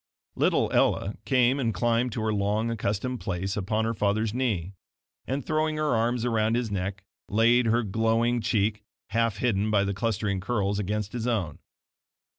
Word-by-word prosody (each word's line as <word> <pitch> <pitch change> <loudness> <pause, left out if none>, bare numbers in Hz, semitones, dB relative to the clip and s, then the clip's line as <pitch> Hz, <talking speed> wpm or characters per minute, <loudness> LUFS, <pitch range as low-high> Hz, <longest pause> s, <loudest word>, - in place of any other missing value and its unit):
Little - - +2
Ella 100 - +2
came 130 0 +3
and 115 -5 0
climbed 120 +1 +1
to 115 - -3
her 110 0 0
long 105 +3 0
accustomed 115 +3 -2
place 95 +1 -3
upon 110 +3 -1
her 115 - 0
father's 105 +1 0
knee, 105 -8 -1 0.5
and 135 0 -2
throwing 155 0 0
her 155 -3 +1
arms 115 +1 0
around 115 -1 +1
his 120 -3 -1
neck, 95 0 -3 0.3
laid 115 +3 +4
her 120 +2 +2
glowing 115 +3 +1
cheek, 105 -1 0 0.3
half 115 -1 +1
hidden 105 -2 +1
by 105 -2 +3
the 100 0 -1
clustering 105 -2 -1
curls, 100 -1 -1
against 105 +1 -2
his 120 -1 -3
own. 100 -11 -1
110 Hz, 165 wpm, -27 LUFS, 100-120 Hz, 0.5 s, laid